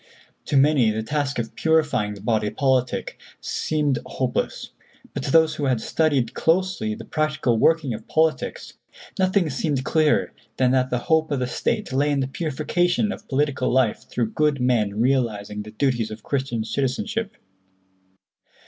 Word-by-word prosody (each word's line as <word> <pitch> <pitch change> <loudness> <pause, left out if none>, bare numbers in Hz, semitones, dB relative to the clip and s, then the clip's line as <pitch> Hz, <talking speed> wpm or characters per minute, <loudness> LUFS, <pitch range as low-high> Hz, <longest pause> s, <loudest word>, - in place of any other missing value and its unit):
"To 140 - +1
many 135 -4 +4
the 110 +1 -2
task 145 +1 -2
of 115 -1 -3
purifying 155 -10 +1
the 100 - -12
body 110 -2 0
politic 130 +2 0 0.2
seemed 150 -4 -1
hopeless, 130 -2 -3 0.4
but - - -3
to - - -3
those 160 0 +5
who 150 -2 -3
had 130 -4 +1
studied 145 0 0
closely 165 - 0
the 115 +1 -10
practical 150 -7 0
working 160 -4 +3
of 110 - -8
politics, 160 0 0 0.5
nothing 185 -1 +2
seemed 140 -1 -1
clearer 155 -1 +2 0.2
than 130 -1 +3
that 130 -1 +2
the 125 - 0
hope 160 -1 +2
of 145 - 0
the 125 - -1
State 125 +1 -2
lay 145 +3 +2
in 145 -1 +1
the 130 - 0
purification 175 +7 0
of - - -9
political 140 -1 0
life 125 -4 +1
through 115 -3 -1
good 150 -2 +1
men 110 -5 +1
realizing 110 -5 0
the 105 - -9
duties 115 0 0
of 110 0 -9
Christian 130 -5 -2
citizenship. 200 - -2
135 Hz, 155 wpm, -23 LUFS, 120-155 Hz, 0.5 s, those